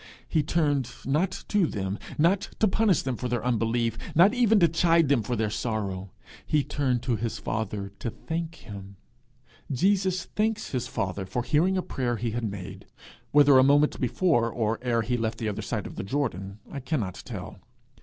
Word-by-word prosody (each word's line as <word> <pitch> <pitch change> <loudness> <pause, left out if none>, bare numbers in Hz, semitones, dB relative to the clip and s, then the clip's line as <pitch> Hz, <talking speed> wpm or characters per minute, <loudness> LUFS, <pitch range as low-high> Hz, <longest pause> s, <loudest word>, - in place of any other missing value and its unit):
He 160 - +2
turned, 145 -4 +1 0.2
not 155 +8 0
to 205 -5 +3
them, 100 -3 -3 0.2
not 175 +6 +2
to 220 - +3
punish 205 -3 +2
them 130 -2 -1
for 125 - -4
their 120 -1 -2
unbelief, 115 -1 0 0.2
not 185 +7 +6
even 230 -4 +4
to 170 - +6
chide 165 -1 +3
them 140 -5 +4
for 120 +4 -2
their 110 -2 -1
sorrow; 100 -5 -3 0.3
he 150 -2 +1
turned 135 -4 -1
to 120 -3 0
his 115 0 -3
father 105 -2 -3
to 115 - -2
thank 165 +6 -4
him. 100 -5 -10 0.8
He 190 +10 +3
thanks 200 +4 -1
him 130 - 0 0.5
for 120 +5 -2
hearing 175 +9 +2
a 185 - 0
prayer 120 -2 -2
he 115 +1 -2
had 115 -1 -2
made 95 0 -8 0.4
whether 145 -2 +6
a - - +7
moment 145 +2 +3
before, 125 -2 +2
or 110 -1 -1
ere 120 -2 +1
he 120 +3 0
left 115 -1 -2
the 110 - -3
other 105 - -3
side - - -3
of - - -8
the - - -3
Jordan, 100 -5 -2
I 140 - -4
cannot 125 - -3
tell. - - -7
125 Hz, 185 wpm, -27 LUFS, 110-165 Hz, 0.8 s, a